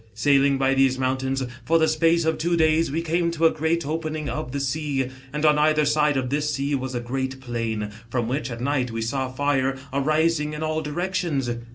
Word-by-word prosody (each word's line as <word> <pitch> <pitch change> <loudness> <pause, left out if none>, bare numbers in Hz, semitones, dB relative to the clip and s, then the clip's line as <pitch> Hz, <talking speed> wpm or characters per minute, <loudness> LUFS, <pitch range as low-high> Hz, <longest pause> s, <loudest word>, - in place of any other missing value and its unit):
Sailing 140 +4 +3
by 135 0 +2
these 135 -1 +3
mountains, 130 +1 -1 0.2
for 165 +6 +3
the 160 -1 +3
space 165 +1 +2
of 160 - 0
two 170 +1 +1
days, 160 0 +3
we 165 +3 -1
came 170 +1 +1
to 165 -1 0
a 160 - +6
great 160 +1 -1
opening 155 0 -3
of 155 -3 -4
thb 140 +2 -3
sea, 140 -1 -1 0.2
and 150 +2 -1
on 150 -1 +5
either 155 0 +3
side 150 -1 +2
of 130 -1 -2
this 150 +1 0
sea, 140 +1 -1
was 130 -2 -2
a - - 0
great 130 +2 -3
plain, 115 -4 -3 0.2
from 120 -2 -1
which, 130 +1 -2
at 120 -1 -6
night, 130 -1 0
we 115 0 -3
saw 130 +2 -2
fire 135 -1 0 0.2
arising 155 +2 +1
in 150 +1 -4
all 155 0 -1
directions. 160 -4 -2
145 Hz, 210 wpm, -24 LUFS, 130-155 Hz, 0.2 s, a